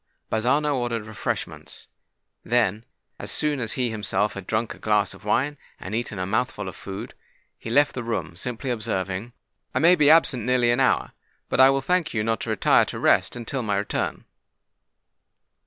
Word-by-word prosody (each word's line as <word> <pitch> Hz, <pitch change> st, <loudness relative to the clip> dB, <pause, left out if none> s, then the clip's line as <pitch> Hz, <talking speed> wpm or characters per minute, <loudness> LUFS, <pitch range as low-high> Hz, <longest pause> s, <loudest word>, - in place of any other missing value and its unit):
Bazzano 140 Hz, +7 st, +2 dB
ordered 120 Hz, -3 st, -2 dB
refreshments: 110 Hz, -1 st, -5 dB, 0.6 s
then, 115 Hz, -2 st, +1 dB, 0.3 s
as -, -, -6 dB
soon 150 Hz, -2 st, 0 dB
as 115 Hz, -3 st, -2 dB
he 125 Hz, -3 st, -1 dB
himself 105 Hz, -1 st, 0 dB
had 100 Hz, -2 st, -8 dB
drunk 110 Hz, +1 st, -1 dB
a -, -, -17 dB
glass 105 Hz, -3 st, +1 dB
of 95 Hz, -, -15 dB
wine 135 Hz, +7 st, 0 dB, 0.2 s
and 95 Hz, -, -7 dB
eaten 115 Hz, -2 st, -3 dB
a 90 Hz, -, -2 dB
mouthful 105 Hz, 0 st, -1 dB
of 95 Hz, -, -7 dB
food, 100 Hz, +4 st, -7 dB, 0.5 s
he -, -, -7 dB
left 145 Hz, +5 st, +3 dB
the 125 Hz, -, -4 dB
room, 95 Hz, -9 st, -3 dB
simply 125 Hz, +6 st, -4 dB
observing, 105 Hz, -1 st, -3 dB, 0.4 s
"I -, -, +2 dB
may 170 Hz, +3 st, +6 dB
be 150 Hz, -5 st, +4 dB
absent 155 Hz, -6 st, +5 dB
nearly 125 Hz, 0 st, +2 dB
an 120 Hz, -, +1 dB
hour; 135 Hz, -, +2 dB, 0.4 s
but -, -, -1 dB
I 130 Hz, 0 st, +9 dB
will 135 Hz, 0 st, +2 dB
thank 180 Hz, -5 st, 0 dB
you 105 Hz, -, +1 dB
not 115 Hz, -1 st, 0 dB
to -, -, -5 dB
retire -, -, +4 dB
to -, -, -6 dB
rest -, -, +2 dB
until 120 Hz, +2 st, -3 dB
my 105 Hz, -4 st, -1 dB
return." 100 Hz, -, -2 dB
115 Hz, 180 wpm, -24 LUFS, 105-130 Hz, 0.6 s, I